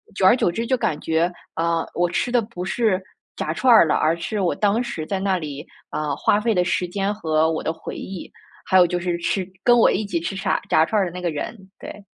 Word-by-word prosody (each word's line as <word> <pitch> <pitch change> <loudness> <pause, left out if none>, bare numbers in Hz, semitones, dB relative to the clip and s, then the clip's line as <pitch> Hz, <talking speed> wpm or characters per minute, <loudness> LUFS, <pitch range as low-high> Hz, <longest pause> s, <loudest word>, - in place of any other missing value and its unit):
久 195 - +1
而 190 - +7
久 210 - +1
之 230 +7 -3
就 260 - +2
感 165 -11 -1
觉， 165 +2 0 0.2
啊， 165 0 0
我 175 0 +1
吃 240 +7 -1
的 245 -1 +3
不 205 -5 -7
是 210 -1 +1 0.4
炸 - - -3
串 255 -2 +4
儿 220 - +7
了， - - +2
而 160 - +2
是 185 +5 -3
我 180 - +1
当 210 +3 +1
时 235 -10 -5
在 195 - -2
那 190 -1 +1
里 145 -3 -7 0.3
呃， 150 -2 -2
花 205 - +2
费 225 +1 +1
的 180 -3 +2
时 180 0 -1
间 195 +3 -1
和 160 -5 +1
我 160 - -3
的 - - 0
回 160 - -8
忆， 190 -2 -7 0.3
还 190 - +3
有 180 - +7
就 175 0 -1
是 175 -1 -2
吃 180 +2 -1 0.2
跟 240 - +6
我 230 - +6
一 215 - 0
起 180 -4 -2
吃 170 +4 -4
炸 190 - -1
炸 160 - +4
串 210 +4 +1
儿 - - +1
的 175 - -5
那 180 - -7
个 175 -2 -1
人。 155 +9 -5 0.2
对。 205 - -10
180 Hz, 270 characters per minute, -22 LUFS, 165-210 Hz, 0.4 s, 而